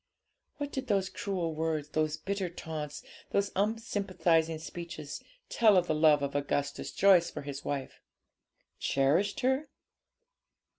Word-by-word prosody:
What 290 -1 -4
did 265 -1 -4
those 195 -3 +1
cruel 180 -5 -2
words, 155 -2 -2
those 155 0 0
bitter 195 -2 -2
taunts, 155 -3 -6 0.3
those 200 0 +1
unsympathising 185 -6 +1
speeches, 160 -2 -7 0.3
tell 215 -4 +5
of 180 - +4
the 155 - 0
love 150 -2 +5
of 140 - -2
Augustus 145 0 -1
Joyce 190 -4 +5
for - - -7
his 140 0 -6
wife? 140 -2 -4 0.8
Cherished 165 - +2
her? 265 +3 +1
165 Hz, 130 wpm, -30 LUFS, 150-200 Hz, 0.8 s, tell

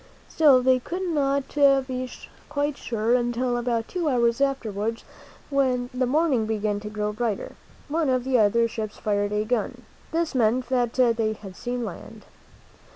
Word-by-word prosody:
Still, 280 -5 +5
they 255 0 +4
could 355 +9 -5
not 280 -5 0
be 265 -3 +2 0.4
quite 290 0 -1
sure 230 -3 -1
until, 240 0 +1
about 235 -1 -1
two 345 -4 -1
hours 235 -1 +2
afterwards, 230 -5 -1 0.5
when 255 -3 +1
the 255 0 0
morning 270 -5 +2
began 210 -1 -1
to 210 0 -7
grow 210 0 -2
brighter, 220 -2 -2 0.4
one 315 -1 0
of 255 -1 +1
the 260 -1 +2
other 230 +2 +3
ships 220 -2 -5
fired 205 -1 -1
a 210 0 0
gun. 245 +2 -2 0.3
This 330 0 -1
meant 245 0 +1
that 245 -2 +1
they 230 -4 +2
had 195 -3 -11
seen 245 +2 -3
land. - - -9
245 Hz, 160 wpm, -25 LUFS, 220-270 Hz, 0.5 s, Still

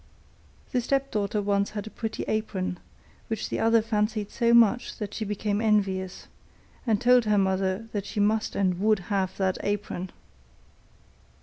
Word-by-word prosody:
The 250 - +1
stepdaughter 230 -6 0
once 200 0 +1
had 210 -1 -5
a 220 - -8
pretty 225 -1 -4
apron, 195 -4 -2 0.5
which 225 -2 -3
the - - -2
other 225 0 +4
fancied 210 -1 -1
so 235 0 +2
much 235 +1 +4
that 210 -2 -5
she 220 - -3
became 210 0 -1
envious, 195 -4 0 0.6
and 215 -3 +3
told 245 0 +5
her 210 -1 +3
mother 190 +2 0
that 205 -2 -3
she 215 - -4
must 215 +1 +1
and 185 -3 +1
would 215 +2 +3 0.2
have 190 -2 0
that 190 -1 0
apron. 205 -3 -3
210 Hz, 150 wpm, -27 LUFS, 195-225 Hz, 0.6 s, told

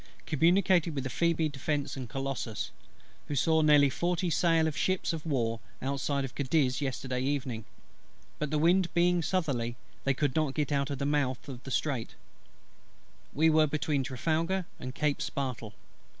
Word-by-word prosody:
Communicated 170 +1 +3
with 135 -2 -3
Phoebe, 165 0 +2
Defence, 145 0 -2
and 130 -3 -6
Colossus, 135 -5 -3 0.6
who 145 - -2
saw 160 +3 +3
near 150 -2 +6
forty 175 +4 0
sail 165 -1 +3
of 155 - -3
ships 185 -2 0
of 165 0 -5
war 115 -6 0 0.2
outside 140 +1 -1
of 125 - -8
Cadiz 135 -1 +1
yesterday 130 -2 -2
evening; 130 -5 -2 0.7
but 150 - -1
the 155 - 0
wind 175 +3 +3
being 175 0 +3
southerly, 140 -10 -1 0.3
they 135 -1 +1
could 145 -1 0
not 155 -4 +1
get 150 -2 0 0.2
to 140 - -3
the 140 +1 -3
mouth 140 -2 0
of 130 -2 -8
the - - -6
Straits. 135 -3 -2 1.2
We 160 +2 +3
were 155 0 +5
between 150 -1 0
Trafalgar 165 +8 -1
and 130 +1 -6
Cape 150 -1 0
Spartel. 130 -7 -4
145 Hz, 155 wpm, -30 LUFS, 135-160 Hz, 1.2 s, near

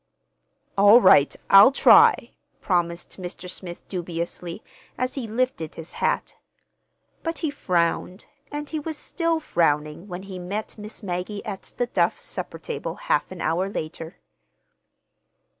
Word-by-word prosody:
"All 205 +4 +8
right, 165 - +6 0.2
I'll 195 +6 +9
try," 280 - +6 0.3
promised 175 0 -2
Mr. 180 0 -6
Smith 180 -1 -8
dubiously, 170 +1 -5 0.3
as 255 +1 -1
he 260 -5 -4
lifted 220 -8 -2
his 165 0 -7
hat. - - -1 0.8
But 330 0 -3
he 300 - 0
frowned, 180 -5 -1 0.3
and 295 0 -4
he 315 - -3
was 310 +1 -5
still 330 0 -1
frowning 150 - 0
when 180 0 -7
he 190 -2 -8
met 200 +5 -5
Miss 210 +2 -8
Maggie 190 +3 -4
at 200 -4 -7
the 245 - +1
Duff 240 - 0
supper - - -6
table 470 - -5
half - - -1
an 185 - -7
hour 175 +5 0
later. 160 -2 -6
190 Hz, 135 wpm, -24 LUFS, 175-245 Hz, 0.8 s, I'll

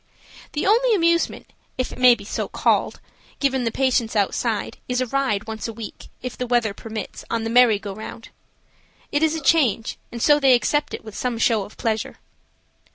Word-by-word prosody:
The 295 - -1
only 460 +3 +4
amusement, 335 -2 +1 0.3
if 255 - -1
so - - -11
it - - -9
may 250 -1 +7
be 200 -3 -12 0.3
called, - - +1 0.4
given 265 -3 +1
the 230 - 0
patients 250 -3 +1
outside, 210 +2 -1
is 250 0 0
a 255 - +1
ride 255 -5 -1
once 220 0 -5
a 230 - -6
week, 220 -1 -9 0.2
if 250 -1 -5
the 250 - -4
weather 235 -4 +1
permits, 220 -1 -7
on 230 -1 -1
the 225 - -2
"merry 240 -3 +6
go 200 -1 -7
round." 220 +2 -9 0.8
It 290 - +1
is 320 0 +2
a 320 - -5
change, 265 -7 +2
and 235 - -6
so 295 +5 +5
they 270 -3 +6
accept 295 +6 0
it - - -11
with 215 -2 -9
some 250 -2 -2
show 225 -3 +2
of 210 - -15
pleasure. 220 -2 -2
240 Hz, 195 wpm, -22 LUFS, 220-275 Hz, 0.8 s, may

